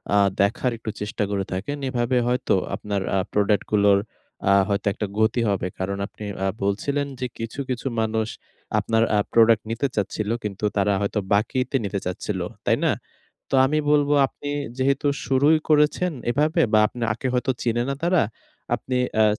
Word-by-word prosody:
আ - - +5 0.2
দেখার 115 +5 +1
একটু 110 - -6
চেষ্টা 105 0 -2
করে 100 -1 -1
দেখেন। 145 +11 -3
এভাবে 125 0 0
হয়তো 125 +1 +1 0.2
আপনার 100 -1 -3
আ - - +3 0.2
প্রোডাক্টগুলোর 105 -1 +3 0.5
আ - - +6 0.2
হয়তো 100 0 -1
একটা 105 - -3
গতি 110 +2 +2
হবে। 95 -3 0
কারণ, 100 +1 -2
আপনি 110 - -12 0.2
আ - - +2 0.2
বলছিলেন 140 +9 0
যে, 130 - -1
কিছু, 115 +4 -6
কিছু 125 +1 -2
মানুষ 110 0 0 0.5
আপনার 115 0 +2
আ - - +4 0.2
প্রোডাক্ট 115 -2 +5
নিতে 120 +5 0
চাচ্ছিল, 105 +1 -2
কিন্তু 105 0 -3
তারা 100 0 +3
হয়তো 100 +1 0
বাকিতে 125 +6 0
নিতে 100 0 -2
চাচ্ছিল। 90 0 -3 0.3
তাই - - +3
না? - - +4 0.6
তো - - -2
আমি 155 +3 +1
বলবো, 145 -1 +3
আপনি 145 - -9 0.3
যেহেতু 135 +2 +1 0.2
শুরুই 145 +4 +4
করেছেন 155 +4 +3 0.2
এভাবে 150 +5 +2
বা, 110 - +6
আপনাকে 115 +1 -3
হয়তো 125 +1 +1
চিনে 120 0 +1
না 140 - 0
তারা, 175 0 +3 0.5
আপনি 130 -1 -2 0.2
অ্যা 110 - +5
115 Hz, 165 wpm, -23 LUFS, 105-135 Hz, 0.6 s, আ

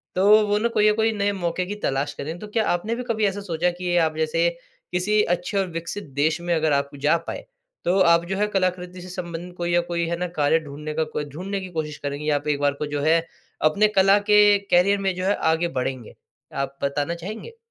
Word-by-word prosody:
तो 190 +2 +2 0.2
वो 205 0 +2
ना 230 +2 +1
कोई 210 -2 +2
ना - - +3
कोई 225 0 +2
नए 205 -1 0
मौके 180 -1 -2
की 205 +3 -5
तलाश 140 +2 -1
करें, 160 +4 -6
तो 210 - -8
क्या 220 +1 0
आपने 210 +7 0
भी 250 - -4
कभी 220 -3 0
ऐसा 200 +1 -1
सोचा 175 -2 0
कि 175 0 -3
आप 160 -2 +2
जैसे 165 +2 +2 0.4
किसी 205 +4 +2
अच्छे 180 +3 -1
और 190 -1 +1
विकसित 165 +5 -5 0.2
देश 155 +3 +2
में 175 0 -1
अगर 155 -2 +1
आप 140 0 +1
जा 150 +3 +4
पाए। - - -5 0.4
तो 185 +3 +2
आप 170 0 +3
जो 190 +2 -3
है 210 +1 +1
कलाकृति 180 -1 -1
से 185 - -10
संबंधित 175 0 -6
कोई 175 0 -2
या 175 - +4
कोई 170 -1 0
है 170 - -1
ना 180 0 -2
कार्य 150 +2 +3
ढूँढने 150 0 -7
का 160 +1 0
कोई 150 - -2
ढूँढने 190 +7 -4
की 185 - -7
कोशिश 150 -2 -4
करेंगी 145 +1 -4
या 145 - +3
आप 145 +1 -3
एक 145 -1 +1
बार 145 -1 +2
को - - +1
जो 145 - -1
है, 160 +2 +4 0.4
अपने 200 +8 +4
कला 195 -1 +4
के 205 -1 +7
करियर 195 +3 +4
में 190 -1 0
जो 185 +1 -3
है 200 - +2 0.2
आगे 170 +2 0
बढ़ेंगे। 130 -2 -3 0.4
आप 135 0 -3
बताना 145 +4 -1
चाहेंगे? 215 - -8
175 Hz, 235 wpm, -23 LUFS, 155-195 Hz, 0.4 s, के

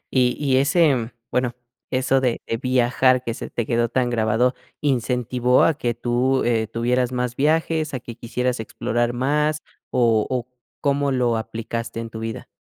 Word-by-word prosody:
Y 125 -1 +3
y 135 -3 +2
ese 140 -5 +3 0.2
bueno, 125 -1 0 0.3
eso 130 +1 +2
de 125 -3 0
de 115 - -2
viajar 130 0 +2
que 115 - -2
se - - -7
te 120 - -2
quedó 120 -1 +1
tan 125 -2 0
grabado, 115 +2 +2 0.3
incentivó 125 -2 +2
a 165 - +4
que 120 -5 -2
tú, 125 +2 +1
eh, 115 -2 +1
tuvieras 125 +2 0
más 125 -1 -2
viajes, 155 0 +1
a - - -3
que 120 -1 -9
quisieras 125 +1 -2
explorar 120 +2 -1
más, 150 +4 0 0.3
o 115 -3 +2
o, 125 -2 -2 0.3
¿cómo 140 -1 +1
lo 125 -3 +1
aplicaste 115 +1 -4
en 115 -1 -6
tu 110 - -7
vida? 115 0 -5
125 Hz, 165 wpm, -22 LUFS, 115-130 Hz, 0.3 s, a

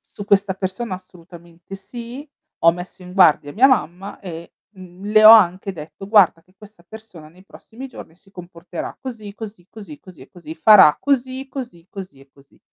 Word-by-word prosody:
Su 205 - -8
questa 200 -1 +2
persona 190 +3 -5
assolutamente 175 -1 -14
sì, 240 +8 -10 0.3
ho 165 - +5
messo 180 +2 -10
in 180 0 -12
guardia 155 -6 +3
mia 240 - +3
mamma 195 - -2
e, 170 -3 -10 0.2
mhmm, 185 -1 -14
le 215 +1 +4
ho 215 - +12
anche 195 -3 +4
detto: 160 +2 -11
"Guarda 195 -6 +3
che 185 - -30
questa 205 -3 -18
persona 200 -8 -13
nei 180 +4 -21
prossimi 235 +6 -12
giorni 245 - -13
si 195 +3 -26
comporterà 175 -2 -9
così, 225 -6 -8
così, 205 -4 -10
così, 220 +9 -12
così, 185 -6 -16
e 130 - -15
così, 160 -3 -11
farà 165 -2 +6
così, 265 -1 -2
così, 245 -11 -9
così, 185 -10 -10
e 135 0 -20
così". 140 0 -25
190 Hz, 180 wpm, -20 LUFS, 170-220 Hz, 0.3 s, ho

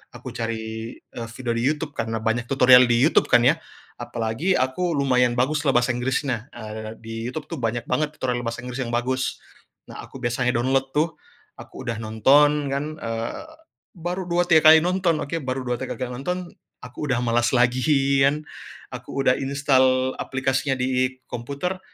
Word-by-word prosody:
aku - - -8
cari, 110 0 -5
eee, 115 -1 -9
video 125 -1 -3
di 115 - -1
YouTube 150 0 -1
karena 115 0 -2
banyak 115 +1 0
tutorial 125 -1 +6
di 120 0 +3
YouTube, 160 - +4
kan, 120 -1 +5
ya. 160 +6 +4 0.4
Apalagi 120 +9 -1
aku 130 +8 0
lumayan 125 -3 +2
baguslah 145 +2 +1
bahasa 120 +1 +3
Inggrisnya, 125 -1 -2
eee, 110 0 -7
di 115 0 -7
YouTube, 145 +4 -6
tuh, 165 - -4
banyak 115 0 -2
banget 150 0 -1
tutorial 125 -2 -2
bahasa 115 0 -4
Inggris 125 +1 -6
yang 115 - -5
bagus. 130 +2 -1 0.5
Nah, - - -10
aku - - -15
biasanya 125 +1 0
download, 135 +2 +1
tuh. 160 +2 +1 0.4
Aku - - -10
udah 115 -1 -2
nonton, 140 +6 +3
kan, 140 +2 -1
eee, 115 - -4 0.5
baru 175 +2 -4
2, 175 +1 +2
3 160 -2 +7
kali 160 - +8
nonton. 180 -3 +1
Oke, 165 +3 -3
baru 130 0 -3
2, 125 - 0
3 130 - -4
kali 130 - -2
nonton, 180 +7 -3 0.4
aku 125 +4 -6
udah 120 - +1
malas 120 +1 +1
lagian. 135 +3 +2 0.5
Aku - - -10
udah 125 - +4
instal 130 -2 +2
aplikasinya 135 +1 -1
di 130 0 0
komputer, 140 +10 -4
130 Hz, 165 wpm, -23 LUFS, 120-145 Hz, 0.5 s, kali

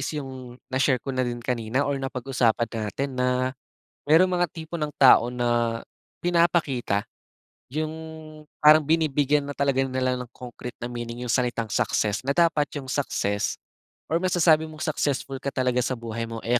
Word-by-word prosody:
is 135 - -2
'yong 130 -3 -7 0.2
na-share 130 0 +3
ko 135 - -3
na 130 - -1
din 120 -1 -1
kanina 120 +2 -1
or 140 -1 -1
napag-usapan 125 -3 0
natin 115 +5 -4
na, 125 0 0 0.5
merong 165 +5 +5
mga 175 -1 +2
tipo 165 +1 -6
ng 150 -2 -3
tao 125 -2 +7
na 120 -1 0 0.4
pinapakita, 170 - +2 0.7
'yong 155 +1 -2 0.7
parang 150 0 +7
binibigyan 150 -2 +2
na 145 - -6
talaga 140 -1 +2
nila 130 -1 0
ng 125 -2 -7
concrete 125 0 -9
na 120 - -6
meaning 120 0 -5
'yong 120 - 0
salitang 120 -2 0
success, 105 +1 +1
na 135 - -4
dapat 165 -4 +3
'yong 140 - -6
success, 105 -7 -1 0.5
or 160 - +2
masasabi 170 -4 +4
mong 155 0 -6
successful 140 -3 -1
ka 140 - -2
talaga 125 -1 +1
sa 130 0 -2
buhay 115 0 -4
mo, 115 - -5
eh, 120 +2 +3
130 Hz, 165 wpm, -25 LUFS, 120-150 Hz, 0.7 s, tao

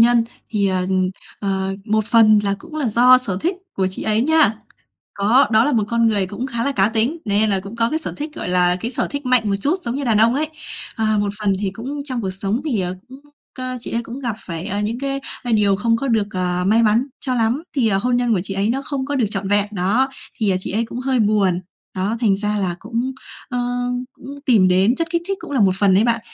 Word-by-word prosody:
nhân. 235 0 +5 0.3
Thì, 205 -3 +1
ờ, 185 -1 0
ừm, 185 -1 +1 0.3
ờ, 195 -1 -1
một 215 -1 +1
phần 225 -3 +5
là 200 -1 0
cũng 330 -2 -11
là 295 -4 -1
do 245 +3 +6
sở 220 -8 -2
thích 355 +3 0 0.2
của 190 - +1
chị 185 - -1
ấy 215 0 +1
nha, 305 -6 +4 0.6
có 215 +7 +4
đó 220 +1 +5
là 295 - +1
một 220 -3 +2
con 230 0 +2
người 205 -4 +2
cũng 210 +7 -5
khá 235 -3 -2
là 280 - 0
cá 195 -5 +3
tính, 230 +8 0
nên 210 +1 +2
là 195 -1 +1
cũng 200 +4 -10
có 230 0 +1
cái 315 - 0
sở 320 - -4
thích, 300 +1 -5
gọi - - -5
là, 180 0 +3
cái 230 - -3
sở - - -1
thích 285 -1 -5
mạnh 250 -2 +4
một - - +1
chút, 310 - +3
giống 235 - -3
như 280 +1 -3
đàn 225 -4 +2
ông 230 +3 +4
ấy. 305 +2 0 0.5
Ờ, 225 - -1 0.2
một 205 -1 -1
phần 205 -2 +1
thì 200 -2 -1
cũng 255 +9 -6
trong 255 -4 -2
cuộc 190 - -2
sống 195 +5 -2
thì, 250 -10 0
ờ, 180 0 -2
cũng, 260 +2 -12 0.3
cơ, 255 -1 -4
chị - - -3
ấy 235 - -1
cũng 235 +3 -8
gặp 240 -5 -3
phải, 165 -4 -5
ờ, 200 - -2
những 215 +3 -2
cái, 275 0 -2 0.2
a, 245 - -2
điều 205 -3 +3
không 230 +3 +1
có 275 +4 -3
được, 220 -4 +1
ờ, 180 -2 -1
may 220 +4 +4
mắn 230 +4 +2
cho 255 -2 +2
lắm, 235 +5 0
thì, 240 -5 +3
ờ, 195 -2 +3
hôn 245 +4 +1
nhân 245 -2 +1
của 180 - 0
chị 195 +1 -1
ấy 195 +2 0
nó 270 +3 -1
không 275 -1 -3
có 285 +1 -3
được 245 -5 +2
trọn 195 -1 0
vẹn, 205 0 +3
đó, 210 +7 +1 0.3
thì, 215 -3 +1
ờ, 185 - +2
chị - - -2
ấy 225 +3 +1
cũng 240 +2 -7
hơi 255 -2 0
buồn, 200 -4 +2 0.3
đó, 195 +4 -1
thành 205 -5 +3
ra 210 +1 -2
là 190 -4 -1
cũng, 235 +5 -3 0.4
ơ, 245 - -3 0.5
cũng - - -16 0.2
tìm 210 -7 +5
đến 190 +6 +3
chất 330 +3 -1
kích 340 0 0
thích 390 - -1
cũng - - -9
là 275 -4 0
một 195 -2 +4
phần 195 -2 +4
đấy 200 +4 +4
bạn. 235 -1 +1
225 Hz, 265 wpm, -20 LUFS, 200-255 Hz, 0.6 s, do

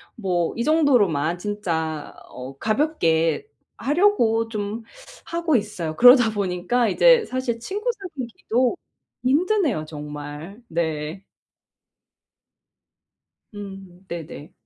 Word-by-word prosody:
뭐 180 -6 -1
이 235 - -1
정도로만 215 - +3
진짜 165 -6 -3
어 130 +2 -9
가볍게 215 - +1 0.3
하려고 275 - +2
좀 215 0 -4 0.4
하고 335 -4 +1
있어요. 195 -7 -4
그러다 245 -2 +8
보니까 200 +4 0
이제 - - +5
사실 255 -2 -2
친구 410 - -3
사귀기도 260 - -2 0.5
힘드네요, 305 - +2
정말. 150 +6 -8
네. 160 +2 -3 2.3
음 195 -3 -10
네네. 160 -3 -8
210 Hz, 190 characters per minute, -23 LUFS, 165-260 Hz, 2.3 s, 그러다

